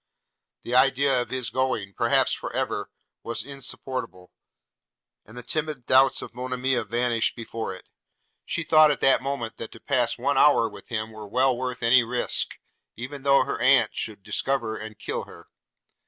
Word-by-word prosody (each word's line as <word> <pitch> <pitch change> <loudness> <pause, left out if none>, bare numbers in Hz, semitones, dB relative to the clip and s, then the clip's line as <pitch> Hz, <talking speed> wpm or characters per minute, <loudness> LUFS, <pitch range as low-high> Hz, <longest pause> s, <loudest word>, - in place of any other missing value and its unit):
The 120 - -5
idea 130 0 +4
of - - -6
his 125 -6 -3
going, 115 -6 -1
perhaps - - +2
for - - -5
ever, - - -2 0.3
was 115 0 -4
insupportable, 130 -8 -5 1.0
and 110 +3 -13
the 125 - -7
timid 150 -1 -3
doubts 130 +1 +4
of - - -10
Monimia 125 +1 -1
vanished 120 -1 0
before 115 -2 -5
it. 95 - -14 0.6
She 170 - -3
thought 155 -1 +6
at 145 - 0
that 135 - +4
moment, 135 -4 -4
that 115 - -7
to 115 - -13
pass 125 -4 0
one 135 +2 +1
hour 145 -6 +5
with 105 - -12
him 110 -2 -3
were 110 -1 -9
well 130 +4 +2
worth 125 0 -4
any 120 +1 +5
risk 120 +1 -1 0.2
– - - -52
even 130 +5 -7
though 140 0 +4
her - - -4
aunt - - +4
should 105 -3 -5
discover 120 -3 -1
and 110 0 -8
kill - - -4
her. - - -15
125 Hz, 170 wpm, -25 LUFS, 115-135 Hz, 1.0 s, thought